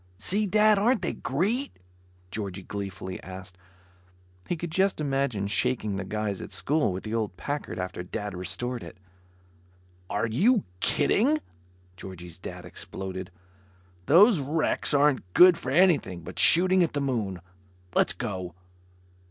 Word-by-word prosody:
"See, 200 - +1
Dad, 215 +1 +4
aren't 230 -1 +2
they - - -1
great?" 215 - -2 0.5
Georgie 100 -3 -5
gleefully 95 -1 -6
asked. 95 0 -10 0.9
He 175 - -1
could 170 0 -5
just 190 +2 +1
imagine 135 -8 -1
shaking 105 0 0
the 95 - -3
guys 105 0 -3
at - - -8
school 150 -6 +1
with 90 +1 -5
the 110 - -5
old 110 -5 -2
Packard, 145 0 -4
after 90 -1 -4
Dad 100 +2 -5
restored 120 +8 -3
it. - - -10 1.1
"Are 105 +3 0
you 195 - +3 0.2
kidding?" 230 - +2 0.6
Georgie's 90 -3 -9
Dad - - -8
exploded, 95 -1 -7 0.8
"Those 190 - +6
wrecks 150 +3 0
aren't 140 -10 +2
good 180 0 +8
for 130 - -6
anything 140 - +3
but - - -7
shooting 185 +2 +6
at 170 - +1
the 145 - -1
moon. 110 -9 -2 0.5
Let's - - +3
go." 90 -2 -5
125 Hz, 135 wpm, -27 LUFS, -, 1.1 s, good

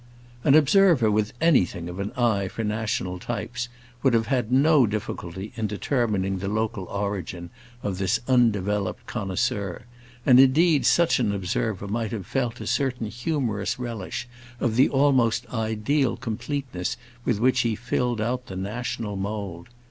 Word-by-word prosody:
An 140 - +5
observer 155 - +5
with 105 0 +1
anything 90 - +2
of 90 +2 -7
an 100 +1 -3
eye 110 -6 +1
for 115 - -5
national 105 -4 -2
types 120 +4 -4 0.3
would 130 -3 +3
have 115 -1 +2
had 120 -1 -1
no 140 -1 +5
difficulty 100 -2 -5
in 110 -1 -1
determining 105 -3 -1
the 95 - -4
local 110 -1 -1
origin 95 -3 -4 0.3
of 95 -2 -2
this 95 +4 +1
undeveloped 105 -6 +1
connoisseur, 100 -1 -2 0.4
and 125 -1 +7
indeed 145 +3 +5
such 170 -5 +4
an 110 -5 +1
observer 100 +1 -2
might 110 +2 -2
have 105 -6 -4
felt 125 0 -2
a - - -6
certain 125 -6 -1
humorous 120 -6 -2
relish 120 -2 -5 0.3
of 115 -3 0
the 130 - +5
almost 130 -4 +3
ideal 115 +4 0
completeness 125 -3 -3 0.3
with 115 -4 0
which 125 +3 +3
he 115 -2 +1
filled 120 +1 -1
out 125 +3 -2
the 95 - -7
national 105 +2 -3
mould. 95 -3 -5
110 Hz, 150 wpm, -25 LUFS, 100-125 Hz, 0.4 s, and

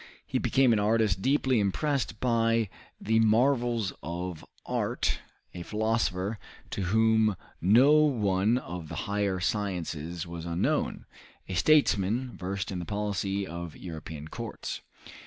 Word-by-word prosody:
He - - -1
became 130 -3 +3
an 110 - +2
artist 105 -3 +2
deeply 130 -1 +2
impressed 110 +2 0
by 115 -3 +2 0.3
the 110 +1 +2
marvels 120 -1 +2
of 85 0 -5 0.2
art, - - -1 0.3
a 90 - -6
philosopher 105 0 -1 0.3
to - - -3
whom 110 +1 +3 0.3
no 115 - +6
one 115 -8 +3
of 85 -8 -6
the 80 - -5
higher 100 -2 0
sciences 85 -3 -2
was 85 -1 -7
unknown, 85 +1 -1 0.4
a - - -5
statesman 120 - +3
versed 95 +1 -4
in 90 - -3
the - - -4
policy 100 -1 -2
of 85 -2 -7
European 80 -3 -7
courts. - - -6
105 Hz, 125 wpm, -28 LUFS, 90-115 Hz, 0.4 s, no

